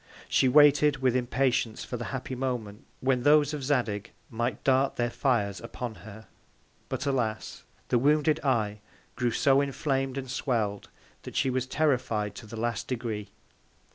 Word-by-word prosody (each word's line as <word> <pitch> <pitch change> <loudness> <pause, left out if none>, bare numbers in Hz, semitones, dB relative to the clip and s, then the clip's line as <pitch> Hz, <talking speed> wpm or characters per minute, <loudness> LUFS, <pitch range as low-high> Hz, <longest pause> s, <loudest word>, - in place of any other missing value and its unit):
She 130 - +3
waited 150 +1 +6
with 130 -2 +1
Impatience 125 -2 0
for - - -5
the 120 0 -4
happy 130 -1 -5
Moment, 120 -5 -4
when 130 -1 +2
those 145 +1 +4
of 145 -2 -4
Zadig 120 -6 -1 0.2
might 120 -1 -2
dart 135 0 +2
their 120 0 -1
Fires 105 -9 0
upon 115 0 -6 0.2
her; 110 +1 -12 0.6
but - - -3
alas! 120 -6 -2 0.3
the 120 - +3
wounded 150 +3 +3
Eye 110 -6 0 0.3
grew 125 0 0
so 135 +4 +3
inflam'd 135 -1 -1
and 135 -1 -4
swell'd, 110 -6 -2 0.3
that - - -10
she 130 - +2
was 130 0 -1
terrified 125 -8 0
to 115 - -10
the 110 +1 -7
last 115 -1 -2
Degree. 110 -5 -4
125 Hz, 155 wpm, -28 LUFS, 115-135 Hz, 0.6 s, waited